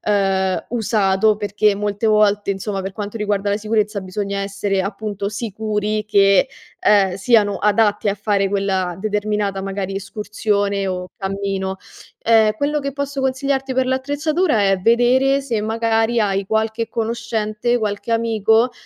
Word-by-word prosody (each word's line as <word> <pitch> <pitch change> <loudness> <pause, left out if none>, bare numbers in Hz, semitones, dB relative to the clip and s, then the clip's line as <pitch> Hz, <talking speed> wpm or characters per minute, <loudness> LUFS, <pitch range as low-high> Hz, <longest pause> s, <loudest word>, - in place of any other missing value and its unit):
ehm, 195 -2 0
usato 215 -3 +2
perché 205 0 +1
molte 205 +1 -2
volte, 210 -2 +3
insomma 195 0 -4
per 190 0 -5
quanto 210 +2 -6
riguarda 205 -1 -1
la 205 - 0
sicurezza 215 -1 -1
bisogna 200 +1 -4
essere 195 0 -1
appunto 200 0 -4
sicuri 215 0 -2
che, 200 +2 +4 0.3
ehm, 195 -3 +3
siano 205 0 +3
adatti 210 0 +2
a 200 - +1
fare 200 -1 0
quella 190 -3 -1
determinata 210 -1 -1
magari 195 0 -4
escursione 200 0 -2
o 180 -1 -3
cammino. 195 -1 -3 0.5
Ehm, 220 -2 +4
quello 295 +4 0
che 280 0 -4
posso 280 -1 -3
consigliarti 265 0 -1
per 260 0 +2
l'attrezzatura 285 - 0
è 195 - +2
vedere 250 +6 +3
se 235 -6 -2
magari 225 +1 0
hai 200 -2 0
qualche 220 +1 -1
conoscente, 230 0 -1
qualche 215 0 -3
amico 225 +1 +2
210 Hz, 135 wpm, -20 LUFS, 200-230 Hz, 0.5 s, che